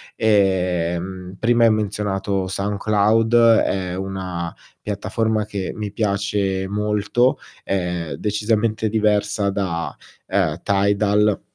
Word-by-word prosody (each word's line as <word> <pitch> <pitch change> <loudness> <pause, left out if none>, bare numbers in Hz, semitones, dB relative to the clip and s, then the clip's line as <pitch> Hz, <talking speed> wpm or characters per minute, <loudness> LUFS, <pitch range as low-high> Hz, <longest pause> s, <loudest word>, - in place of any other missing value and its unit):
Ehm 90 -3 0
prima 120 0 +3
hai 115 - +5
menzionato 100 -2 -1
SoundCloud, 105 +3 +1
è 100 -6 +3
una 95 -3 -4 0.3
piattaforma 110 +2 -1
che 100 -3 -4
mi 105 -2 -4
piace 100 -2 -1
molto, 105 +4 +1 0.3
è 90 -4 -2
decisamente 110 +1 0
diversa 105 -1 +1
da, 90 -5 -2 0.3
ehm, 85 -4 0
Tidal 100 +1 +2
100 Hz, 95 wpm, -21 LUFS, 95-105 Hz, 0.3 s, hai